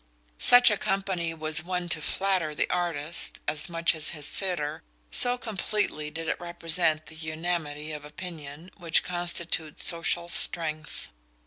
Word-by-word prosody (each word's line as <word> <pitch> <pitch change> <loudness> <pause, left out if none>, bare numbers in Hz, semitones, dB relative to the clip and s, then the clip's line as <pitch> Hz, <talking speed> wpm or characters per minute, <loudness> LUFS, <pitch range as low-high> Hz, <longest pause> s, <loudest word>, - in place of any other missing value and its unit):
Such 245 -1 +8
a 210 - +1
company 190 -4 -2
was 155 -1 +4
one 180 0 -3
to 155 - +1
flatter 180 -2 0
the - - 0
artist 170 -3 -2
as 155 +4 -1
much 170 0 +3
his 155 -1 0 0.2
sitter, 170 -5 -1 0.3
so 245 0 +3
completely 210 -8 -3
did 165 +1 -6
it - - -2
represent 165 -2 0
that 160 +1 -12
unamity 155 -2 -4
of 150 -1 -7
opinion 155 +1 -9
which 170 -3 +2
constitutes 170 -3 -2
social 170 0 +1
strength. 155 -3 +1
165 Hz, 135 wpm, -27 LUFS, 155-180 Hz, 0.3 s, Such